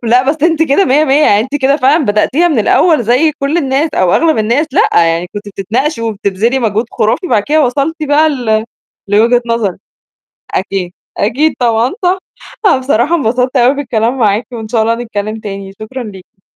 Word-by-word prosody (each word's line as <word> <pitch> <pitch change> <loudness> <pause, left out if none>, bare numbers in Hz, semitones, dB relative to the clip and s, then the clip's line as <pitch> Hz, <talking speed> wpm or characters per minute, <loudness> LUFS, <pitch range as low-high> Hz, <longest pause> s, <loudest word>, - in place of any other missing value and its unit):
لأ، 240 +2 +3
بس 305 0 -5
أنتِ 325 -1 +2
كده 315 +6 +2
مِيّة، 285 +4 +3
مِيّة 290 +2 +3
يعني 205 +1 +4
أنتِ 260 +5 -5
كده 275 +1 +2
فعلًا 295 +3 +2
بدأتيها 260 +11 +1
من 295 - 0
الأول 310 - +3
زي 255 +8 +2
كل 285 +2 -2
الناس 280 +1 0
أو 185 -2 +2
أغلب 320 -4 +2
الناس، 235 +8 +1
لأ، - - +3 0.2
يعني 165 +2 -1
كنتِ 205 0 -6
بتتناقشي 230 - -2
وبتبذلي 220 +3 -1
مجهود 225 -1 -1
خُرافي، 220 - -1
بعد 215 - +1
كده 300 +5 +2
وصلتِ 280 +6 -1
بقى 305 +2 +3
ل 225 -6 -1 0.4
لوجهة 230 +4 +3
نظرِك 230 -6 -1 0.8
أكيد، 190 -2 -2 0.3
أكيد 270 +9 +1
طبعًا 235 +1 +1
صح. 365 +1 +2 0.5
أنا 350 - +4
بصراحة 260 +4 +1
انبسطت 255 -1 0
أوي 250 +3 +3
بالكلام 245 -3 -1
معاكِ، 215 -1 +1
وإن 225 -3 -7
شاء 220 0 0
الله 230 +1 +1
نتكلّم 220 -2 -5
تاني، 195 -2 -7
شكرًا 245 +4 -6
ليكِ. 190 -2 -13
245 Hz, 180 wpm, -12 LUFS, 215-290 Hz, 0.8 s, يعني